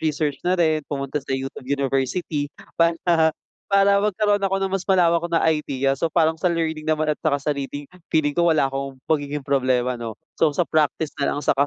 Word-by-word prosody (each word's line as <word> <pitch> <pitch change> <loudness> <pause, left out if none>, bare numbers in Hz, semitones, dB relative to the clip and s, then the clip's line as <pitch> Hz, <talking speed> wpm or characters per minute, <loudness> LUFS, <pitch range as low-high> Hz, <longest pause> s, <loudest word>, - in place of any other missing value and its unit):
research 150 -2 -1
na 180 +1 +1
rin, 160 -3 +2
pumunta 140 0 -3
sa 135 -1 -3
YouTube 135 -1 -7
University 140 +2 -1 0.3
para, 170 0 +4 0.7
para 200 0 +4
magkaroon 205 0 +1
ako 195 -1 0
ng 195 - 0
mas 180 - -10
malawak 170 -3 +3
na 170 -1 +1
idea 135 -3 -1
so - - +1
parang 160 0 +1
sa 180 - -1
learning 160 -3 -1
naman 155 0 +1
at 150 - -2
saka 155 -2 +1
sa 150 - 0
reading, 145 0 -4 0.3
feeling 155 -2 +3
ko, 170 +4 +1
wala 140 -3 +2
akong 135 0 -4 0.2
magiging 145 -1 0
problema 130 -3 +1
'no. 115 -2 -5 0.2
So 155 -3 +3
sa 175 - +2
practice 155 0 +1
na 140 - +1
lang 145 - -4
saka 140 0 +2
150 Hz, 195 wpm, -22 LUFS, 140-170 Hz, 0.7 s, para